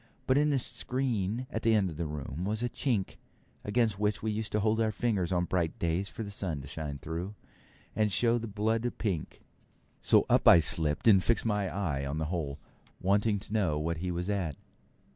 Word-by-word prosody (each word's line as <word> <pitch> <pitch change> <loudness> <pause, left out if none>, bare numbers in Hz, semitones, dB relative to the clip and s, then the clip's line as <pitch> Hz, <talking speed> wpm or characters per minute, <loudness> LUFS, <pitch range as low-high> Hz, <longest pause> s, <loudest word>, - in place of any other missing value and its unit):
But 130 - +3
in 150 +1 +3
the 140 - +2
screen 125 -3 -2
at 110 - -2
the 115 -1 +3
end 95 -4 +2
of 75 - -9
the 85 -1 -2
room 75 +2 -5
was 105 +4 -2
a 120 - 0
chink, 115 -5 -1 0.5
against 110 -2 +1
which 105 0 0
we 110 - 0
used 105 0 -3
to 105 - +2
hold 110 +2 +2
our 110 -1 +2
fingers 105 -5 0
on 90 -1 +1
bright 85 -3 -1
days 85 +4 -1
for 115 - -6
the 100 - -7
sun 90 -7 -3
to 65 - -10
shine 75 -2 -5
through, 85 +8 -5 0.6
and 105 -1 +2
show 120 +3 +2
the 115 - -5
blood 110 +3 0
pink; 95 -8 -3 0.6
so - - +4
up - - +3
I 85 - +10
slipped 80 +2 0
and 95 -4 +7
fixed 115 - +2
my 105 -3 +1
eye 80 -6 -2
to 70 +1 -3
the 80 0 -1
hole, 70 -5 -2 0.4
wanting 105 +3 +2
to 105 - -9
know 95 -9 +1
what 80 +2 -1
he 90 +3 -3
was 90 +1 -2
at. 95 -8 -1
100 Hz, 210 wpm, -30 LUFS, 85-110 Hz, 0.6 s, I